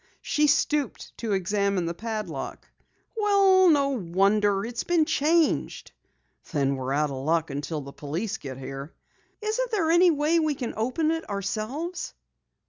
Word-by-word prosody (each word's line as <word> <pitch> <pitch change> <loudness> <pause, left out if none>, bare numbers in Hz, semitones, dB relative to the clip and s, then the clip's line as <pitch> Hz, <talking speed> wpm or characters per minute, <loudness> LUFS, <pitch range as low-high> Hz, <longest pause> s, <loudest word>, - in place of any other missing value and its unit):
She 300 0 +2
stooped 295 0 0
to 225 -3 -1
examine 195 -1 0
the 170 - -2
padlock. 215 +3 -5 0.5
"Well, 395 -3 +5
no 285 -3 +4
wonder! 200 -1 +1
It's 235 0 -4
been 340 -3 +2
changed." 315 +3 +1 0.6
"Then 140 -3 +1
we're 130 0 -4
out 150 +1 +1
of 130 -1 -5
luck 160 0 +1
until 145 +2 -3
the 140 0 -10
police 180 +9 -4
get 130 -2 -8
here." 135 +3 -7 0.5
"Isn't 460 +4 -1
there 365 -8 +1
any 350 +2 +6
way 310 +1 +2
we 310 -2 +1
can 245 -3 -4
open 255 +8 0
it 325 -5 -3
ourselves?" 215 - -4
220 Hz, 145 wpm, -26 LUFS, -, 0.6 s, any